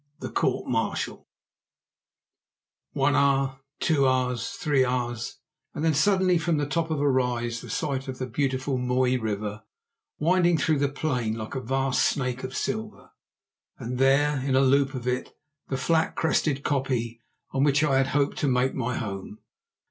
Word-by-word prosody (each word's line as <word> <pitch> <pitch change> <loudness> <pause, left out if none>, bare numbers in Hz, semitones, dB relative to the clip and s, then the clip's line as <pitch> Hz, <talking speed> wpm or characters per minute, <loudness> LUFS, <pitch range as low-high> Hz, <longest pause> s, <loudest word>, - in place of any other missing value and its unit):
THE - - -6
COURT - - 0
MARTIAL - - -2 1.7
One - - +2
hour, 135 -1 +2 0.2
two 140 -5 +3
hours, 125 -2 0
three 145 -5 +2
hours, 120 -2 -2 0.4
and 150 - -2
then 160 - +3
suddenly 185 +3 +3
from 165 -1 0
the 145 - 0
top 165 +3 -1
of 155 -2 -1
a 145 - +2
rise 120 -3 0
the - - -10
sight 135 -2 -2
of 130 -1 -5
the 130 - -3
beautiful 130 +1 -1
Mooi 125 0 +1
River 105 -2 -3 0.6
winding 175 +1 +3
through 150 0 +1
the 140 0 +2
plain 125 -6 -1
like 110 -1 -6
a 135 - -3
vast 135 +1 +1
snake 125 -2 -1
of 130 0 -5
silver, 220 0 -4 0.7
and 125 +2 -5
there, 140 +2 +3
in 130 0 0
a 135 - +5
loop 135 0 +3
of 125 -1 -5
it, 125 +1 -2 0.3
the 135 - -2
flat 160 +4 +1
crested 150 -3 +1
koppie 125 -5 -1 0.3
on 135 - +1
which 145 +1 +3
I 140 -3 +3
had 135 0 +3
hoped 140 +1 0
to 145 - +1
make 130 0 +2
my 125 -2 -2
home. 100 0 -5
135 Hz, 165 wpm, -26 LUFS, 125-145 Hz, 1.7 s, a